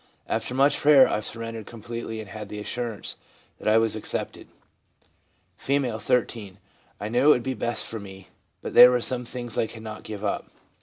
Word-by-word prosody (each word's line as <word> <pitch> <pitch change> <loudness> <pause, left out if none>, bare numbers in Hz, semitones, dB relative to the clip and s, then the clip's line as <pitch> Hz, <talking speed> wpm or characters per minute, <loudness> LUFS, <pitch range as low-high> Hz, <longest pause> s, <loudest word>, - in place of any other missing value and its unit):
After 125 - -2
much 140 +2 +3
prayer 145 -2 +7
I - - 0
surrendered 115 0 -6
completely, 115 0 -6
and 110 -3 -8
had 105 +1 -8
the 105 - -6
assurance 115 0 -4 0.4
that - - -6
I 110 +1 +5
was 115 -1 +2
accepted.' 110 - -5 1.2
R, 130 -5 +1
13. 110 -6 -1 0.2
' - - -35
I 105 - -4
knew 120 +5 +1
it - - +7
would 125 -5 +5
be 130 - -2
best 120 -2 -2
for 115 - -5
me, 95 -2 -11 0.3
but - - -5
there 125 - +10
were 125 0 +2
some 125 +1 -1
things 120 -1 -4
I 110 - +1
could 110 -1 -11
not 110 -1 -7
give 105 -1 -7
up. 100 - -2
115 Hz, 195 wpm, -25 LUFS, 105-125 Hz, 1.2 s, there